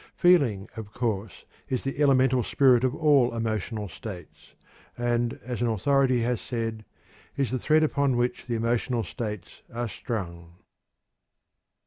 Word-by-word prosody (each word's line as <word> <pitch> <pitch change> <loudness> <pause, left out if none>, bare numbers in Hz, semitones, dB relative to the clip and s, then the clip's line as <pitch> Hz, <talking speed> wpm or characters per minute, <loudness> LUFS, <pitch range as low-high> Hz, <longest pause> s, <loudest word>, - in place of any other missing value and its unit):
Feeling, 140 - +3
of 110 -1 -8
course, 110 -5 -3 0.2
is 130 -2 -1
the 135 +2 -3
elemental 130 -2 +4
spirit 125 +1 +4
of 130 +1 +1
all 145 -7 +3
emotional 110 -1 -2
states, 90 -2 -10 0.4
and, 120 -1 0
as 125 -1 -4
an 120 - +2
authority 130 +3 +2
has 120 -1 -1
said, 115 -3 -4 0.5
is 135 -3 0
the 130 - -1
thread 155 +3 +3
upon 140 -4 +1
which 125 +1 -1
the 120 - -1
emotional 115 +1 0
states 105 +1 -6
are 120 +1 -3
strung. 85 -7 -6
120 Hz, 135 wpm, -26 LUFS, 110-130 Hz, 0.5 s, elemental